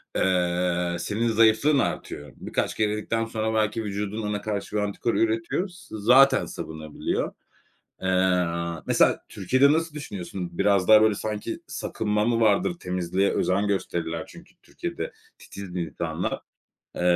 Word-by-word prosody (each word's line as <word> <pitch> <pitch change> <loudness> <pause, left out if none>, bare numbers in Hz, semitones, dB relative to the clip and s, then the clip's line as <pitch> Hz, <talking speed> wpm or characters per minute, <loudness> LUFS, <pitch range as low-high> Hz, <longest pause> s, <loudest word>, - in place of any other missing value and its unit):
eee, 90 -1 +1
senin 110 +6 -1
zayıflığın 115 +6 +4
artıyor. 75 -2 -3
Birkaç - - -2
kere 105 -1 +1
yedikten 115 +1 -1
sonra 110 0 -2
belki 110 +1 +1
vücudun 105 +1 -3
ona 105 0 -2
karşı 105 0 -4
bir 105 - +2
antikor 105 +3 -1
üretiyor. 115 - 0
S 175 -10 -12
zaten 130 +5 +5
savunabiliyor. 80 -1 -4 0.7
Eee, 90 -3 +1
mesela - - +4
Türkiye'de 140 +2 +3
nasıl 160 0 0
düşünüyorsun? 95 -9 -5
Biraz 100 -2 +3
daha, 110 0 +8
böyle, 110 -2 +4
sanki 105 0 -4
sakınma 105 0 -1
mı 115 -1 +2
vardır? 110 - +3
Temizliğe 90 +2 0
özen 100 +3 +1
gösterirler 85 -4 -2
çünkü - - -15
Türkiye'de - - -5 0.3
titizdir 90 -3 -7
insanlar. 75 -6 -3 0.5
Eee, - - -4
105 Hz, 135 wpm, -25 LUFS, 90-110 Hz, 0.7 s, daha